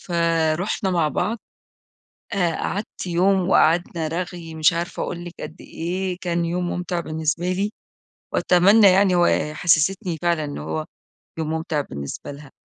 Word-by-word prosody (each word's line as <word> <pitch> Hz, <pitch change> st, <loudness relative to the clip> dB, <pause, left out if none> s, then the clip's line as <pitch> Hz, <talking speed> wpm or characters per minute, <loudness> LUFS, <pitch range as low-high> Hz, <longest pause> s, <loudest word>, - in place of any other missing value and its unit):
فرُحنا 170 Hz, +2 st, 0 dB
مع 165 Hz, -4 st, +2 dB
بعض، 210 Hz, +9 st, -1 dB, 1.0 s
آآ 175 Hz, -5 st, +1 dB
قعدت 200 Hz, 0 st, -4 dB
يوم 185 Hz, +2 st, +2 dB
وقعدنا 165 Hz, -1 st, +3 dB
رغي، 170 Hz, -1 st, -5 dB
مش 155 Hz, +1 st, +4 dB
عارفة 170 Hz, +1 st, -3 dB
أقول 175 Hz, 0 st, -5 dB
لِك 175 Hz, -, -8 dB
قد 160 Hz, -, -8 dB
إيه، 180 Hz, +2 st, -3 dB
كان 170 Hz, -1 st, 0 dB
يوم 175 Hz, +1 st, -1 dB
ممتع 175 Hz, 0 st, -2 dB
بالنسبة 160 Hz, +2 st, -1 dB
لي، 200 Hz, +3 st, -1 dB, 0.6 s
وأتمنى 200 Hz, +4 st, +5 dB
يعني 190 Hz, 0 st, +4 dB
وحسستني 175 Hz, +2 st, +2 dB
فعلًا 170 Hz, -3 st, +1 dB
إن 145 Hz, -, -5 dB
هو 80 Hz, +1 st, -3 dB, 0.5 s
يوم 155 Hz, -1 st, -2 dB
ممتع 160 Hz, -2 st, -1 dB
بالنسبة 70 Hz, -, -7 dB
لها. 140 Hz, -1 st, -12 dB
170 Hz, 135 wpm, -22 LUFS, 160-180 Hz, 1.0 s, وأتمنى